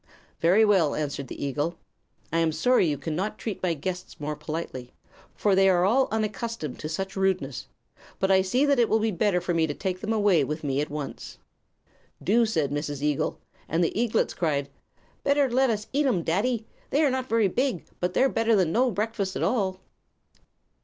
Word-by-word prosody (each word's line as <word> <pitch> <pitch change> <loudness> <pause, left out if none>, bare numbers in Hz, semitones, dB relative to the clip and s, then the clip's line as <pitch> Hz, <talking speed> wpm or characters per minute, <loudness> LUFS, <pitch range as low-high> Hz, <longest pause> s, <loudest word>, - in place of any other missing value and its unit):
"Very 190 +7 +5
well," 190 -8 +3
answered 140 -2 -3
the 140 - -5
eagle. 145 +5 -2 0.6
"I 165 - +2
am 165 -1 +2
sorry 245 +2 +3
you 145 -2 0
cannot 180 +9 -3
treat 215 -5 -5
my 175 -3 0
guests 180 +4 -5
more 150 +1 -3
politely, 150 -6 -6 0.4
for 205 - +2
they 195 0 +5
are 180 -1 +3
all 255 +7 +3
unaccustomed 215 - -3
to 155 - -5
such 190 +4 -4
rudeness. 185 - -1 0.5
But 190 0 +1
I 190 0 +5
see 245 +9 +2
that 280 -3 +3
it 235 - +3
will 220 - +4
be 220 0 0
better 200 0 +1
for 175 - -2
me 165 -1 +2
to 145 - -4
take 185 -2 -3
them 215 - -2
away 205 -8 +3
with 150 +3 -4
me 140 -1 0
at 150 - -3
once." 145 -1 -6 0.9
"Do," 230 +3 +3
said 155 -10 0
Mrs. 145 -1 -3
Eagle; 150 +1 0 0.3
and 165 +2 +1
the 165 - -1
eaglets 230 +1 +1
cried: 145 -5 -1 0.5
"Better 280 0 +3
let 260 +1 +3
us 215 -2 -1
eat 285 +1 +2
'em, 190 -10 +1
daddy. 220 +8 0 0.2
They 295 +3 +2
are 285 - +3
not 260 0 -2
very 225 -2 +3
big, 245 -1 -1
but 180 0 -2
they're 265 - +5
better 225 -3 +2
than 185 -5 +2
no 250 +7 +3
breakfast 210 -2 -2
at - - -1
all." 190 -6 0
190 Hz, 195 wpm, -26 LUFS, 155-225 Hz, 0.9 s, Very